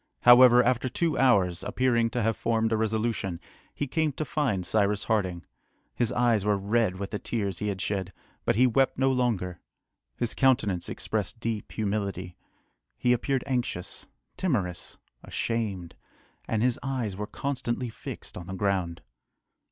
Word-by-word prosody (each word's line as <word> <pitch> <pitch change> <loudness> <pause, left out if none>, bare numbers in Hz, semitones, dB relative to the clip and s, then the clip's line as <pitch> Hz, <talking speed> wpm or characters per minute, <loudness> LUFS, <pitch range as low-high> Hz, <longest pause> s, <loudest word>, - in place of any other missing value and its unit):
However, 125 0 +8
after 130 +1 +1
two 165 +5 0
hours, 95 -9 +3
appearing 120 -2 +1
to 120 0 -1
have 115 0 +1
formed 115 -1 0
a - - +3
resolution, 110 -4 -1 0.3
he 145 - -3
came 155 +3 0
to 155 - -3
find 125 -10 -1
Cyrus 105 +1 +1
Harding. 95 -6 -1 0.5
His 120 -1 0
eyes 120 -4 +2
were 105 -1 +2
red 105 0 +1
with 100 0 -5
the 105 - -3
tears 100 -6 -2
he 105 - -2
had 100 -2 -2
shed, 95 0 -2 0.3
but - - +1
he 125 +4 +5
wept 135 +2 +2
no 135 0 +3
longer. 110 -9 -1 0.6
His 120 -2 0
countenance 110 -10 +2
expressed 110 +2 -3
deep 115 -2 -4
humility. 100 -4 -2 0.6
He 125 - +3
appeared 130 +2 0
anxious, 125 -9 -3 0.3
timorous, 100 - -2 0.3
ashamed, 105 -7 -3 0.5
and 110 0 0
his 125 -1 +1
eyes 125 -7 -2
were 105 +2 -4
constantly 125 -2 -3
fixed - - -8
on 90 -1 -8
the 95 - -5
ground. 95 -4 -1
110 Hz, 150 wpm, -27 LUFS, 100-125 Hz, 0.6 s, However